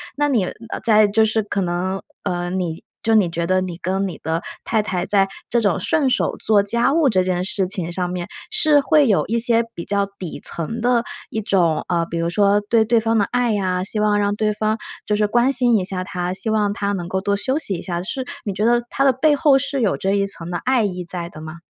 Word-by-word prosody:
那 290 0 +1
你， 230 -9 +2
呃， 230 +5 -7
在 215 -2 +6
就 220 +2 +3
是 220 0 0
可 200 -1 -3
能 185 +1 -2 0.2
呃， 175 -2 -2
你 175 -3 -3 0.2
就 225 - +2
你 195 -5 +4
觉 170 0 -2
得 185 +1 +2
你 180 -2 -5
跟 190 +2 -1
你 180 - -7
的 160 +2 -2 0.2
太 220 -2 +1
太 185 -4 -2
在 195 -1 +3 0.2
这 235 0 +2
种 200 -5 +1
顺 285 -5 +1
手 - - +1
做 210 -2 +3
家 235 +5 +1
务 325 -3 +3
这 185 -4 +2
件 180 -1 -1
事 190 -1 0
情 180 -3 -2
上 180 0 -2
面， 180 -1 -4 0.2
是 310 -9 +4
会 300 0 +4
有 205 -4 +2
一 230 +2 0
些 230 0 +3
比 170 - -7
较 200 0 +1
底 180 -4 -6
层 225 +8 -3
的 240 -1 +2 0.3
一 220 - -3
种， 175 -6 +1
呃， 170 -2 0
比 170 - -5
如 165 0 0
说 200 +2 +3
对 230 -1 +4
对 230 +1 +3
方 225 0 +1
的 205 - +3
爱 245 -2 +1
呀， 185 -3 -1
希 210 +2 -2
望 210 -1 +2
让 205 0 0
对 215 0 0
方 215 +1 0 0.3
就 210 - 0
是 210 - +2
关 240 +4 +2
心 245 -3 +3
一 185 - -1
下 185 -1 -1
她， 180 -1 -3
希 220 +4 -2
望 210 -2 +1
她 200 -1 -2
能 175 -3 -4
够 190 +1 -2
多 200 0 0
休 260 +7 -1
息 205 -11 -2
一 170 - -6
下， 175 -2 -3
是 255 +6 -4 0.2
你 200 - -3
觉 210 +3 -1
得 240 0 +3
它 275 - 0
的 270 - +5
背 295 +4 +3
后 290 -2 +4
是 275 0 -1
有 210 - +2
这 195 - -1
一 200 0 +2
层 175 -3 -8
的 175 - -1
爱 255 -3 +3
意 180 -3 -3
在 170 0 -4
的 155 - -12
吗？ 155 +2 -9
205 Hz, 270 characters per minute, -20 LUFS, 180-230 Hz, 0.3 s, 在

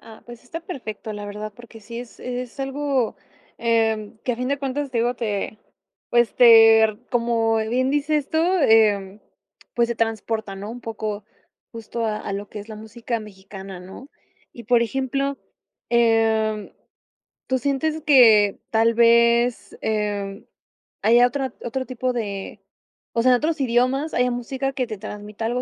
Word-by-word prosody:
Ah, 220 -1 -14
pues 240 0 -11
está 325 +7 -7
perfecto, 225 - -7
la 205 0 -6
verdad, 210 +1 -6
porque 235 -1 -14
sí 235 +3 -8
es 245 -2 -12
es 250 +1 -6
algo, 270 -3 -1 0.4
em, 225 -2 0
que 250 - 0
a 230 - -5
fin 250 +1 -3
de 280 - 0
cuentas, 275 +1 -3
te 240 - -1
digo, 240 +2 +1
te 215 -3 -3 0.5
pues, 240 -1 +2
ter 225 -2 +7
como 230 -2 +1
bien 245 +4 0
dices 295 0 0
tú, 315 - 0
em, 220 - +3 0.5
pues 235 -1 +2
se 235 - -1
transporta, 225 -2 -2
¿no?, 205 +2 -7
un 245 +1 -8
poco, 215 -2 -5 0.5
justo 230 0 -5
a 215 -1 -1
a 200 - -5
lo 200 +1 -5
que - - -8
es 210 +2 -10
la 215 - -8
música 225 +2 -5
mexicana, 195 -2 -10
¿no? 190 +9 -11 0.4
Y 235 - -11
por 240 -1 +3
ejemplo, 270 +3 -2 0.5
em, 225 -2 +2 0.8
¿tú 260 - +1
sientes 295 +4 -1
que 225 -9 +6
tal 225 +1 +3
vez, 235 +1 +3
em, 205 -2 -2 0.6
haya 240 +3 +6
otra 265 -1 -3
otro 260 +2 -3
tipo 255 0 -2
de 200 -5 -5 0.6
o 230 - +3
sea, 255 - +5
en 250 - +5
otros 310 +1 -1
idiomas, 255 +5 +1
haya 250 0 +2
música 265 +3 -3
que 255 -2 -2
te 215 - -6
transmita 210 +1 -7
algo 245 +2 -1
230 Hz, 160 wpm, -22 LUFS, 215-255 Hz, 0.8 s, ter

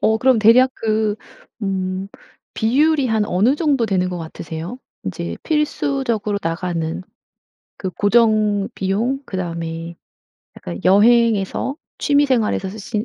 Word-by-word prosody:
어 220 - +3
그럼 255 -1 +4
대략 235 +4 +6
그 215 -1 0 0.4
음 190 -1 -2 0.5
비율이 280 +4 +2
한 220 -2 +1
어느 215 +10 +2
정도 285 -7 +1
되는 185 -3 0
것 180 - -4
같으세요? 165 +5 -7 0.3
이제 85 -2 -4
필수적으로 270 -8 -1
나가는 165 0 -3 0.8
그 190 - -3
고정비용 210 +2 +1
그다음에 170 -2 -5 0.6
약간 85 0 -7
여행에서 225 +4 +3 0.2
취미생활에서 260 -9 +2
쓰시는 210 +1 -4
210 Hz, 260 characters per minute, -20 LUFS, 185-240 Hz, 0.8 s, 대략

